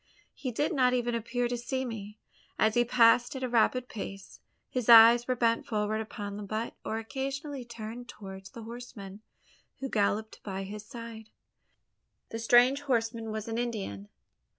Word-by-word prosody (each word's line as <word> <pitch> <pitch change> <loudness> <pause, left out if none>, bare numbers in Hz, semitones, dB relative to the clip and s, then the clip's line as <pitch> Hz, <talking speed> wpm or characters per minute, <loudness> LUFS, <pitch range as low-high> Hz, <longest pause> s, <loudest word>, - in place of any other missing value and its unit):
He 255 - -4
did 295 +9 0
not 255 -4 +3
even 240 -1 0
appear 235 +2 -1
to 245 - -2
see 260 +2 -3
me! 210 -3 -7 0.4
As 220 0 +3
he 240 - +4
passed 240 +1 +4
at 260 - -4
a - - +1
rapid 245 +1 +2
pace, 195 -3 -8 0.3
his 250 -2 -3
eyes 235 +1 +9
were 255 - +1
bent 230 -1 +1
forward 215 0 -1
upon 205 -2 -6
the - - -6
butte, 215 +3 -3
or 220 - -2
occasionally 270 +4 -4
turned 235 +1 -8
towards 195 -1 -9
the 230 - -10
horseman 215 -4 -9 0.6
who 270 - -3
galloped 215 0 0
by 195 -1 -4
his 205 +2 -7
side. 230 -3 -9 1.0
The 225 - -4
strange 245 +4 +5
horseman 230 -4 -1
was 215 0 -4
an 225 +1 -2
Indian. 195 - -4
230 Hz, 165 wpm, -30 LUFS, 215-245 Hz, 1.0 s, eyes